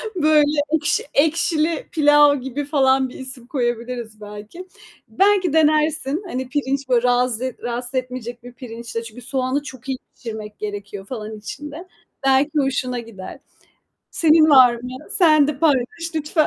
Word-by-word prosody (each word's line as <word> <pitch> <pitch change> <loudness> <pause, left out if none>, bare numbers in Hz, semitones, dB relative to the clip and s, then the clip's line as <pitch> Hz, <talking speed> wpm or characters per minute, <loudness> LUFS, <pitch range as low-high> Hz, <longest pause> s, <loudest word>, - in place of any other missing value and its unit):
Böyle, 300 -2 +3
ekşi 315 -2 +1
ekşili 315 +1 +1
pilav 295 -2 +5
gibi 270 +2 -4
falan 265 -3 +2
bir - - -11
isim 260 -2 -9
koyabiliriz 240 -4 -3
belki. 210 - -10 0.4
Belki 385 -4 +2
denersin. 310 +1 +2
Hani, 260 -4 -4
pirinç, 275 -2 -2
böyle, 245 -1 +3
razı 250 0 0
rahatsız 245 +2 -4
etmeyecek 250 -2 -4
bir 245 0 -11
pirinçle. 235 -1 -7
Çünkü 230 +2 -11
soğanı 260 +3 -2
çok 260 -1 -10
iyi 260 - -1 0.2
pişirmek 215 -2 -8
gerekiyor 205 -1 -6
falan 215 -2 -6
içinde. 295 - -8 0.4
Belki 270 +3 +3
hoşuna 255 -2 -1
gider. 215 -5 -9 0.7
Senin 315 -1 +4
var 255 -3 +7
mı? 250 +2 -7
Sen 310 -8 +5
de 280 -3 -3
paylaş 275 -7 +3 0.3
lütfen. 310 0 +1
260 Hz, 140 wpm, -21 LUFS, 240-300 Hz, 0.7 s, var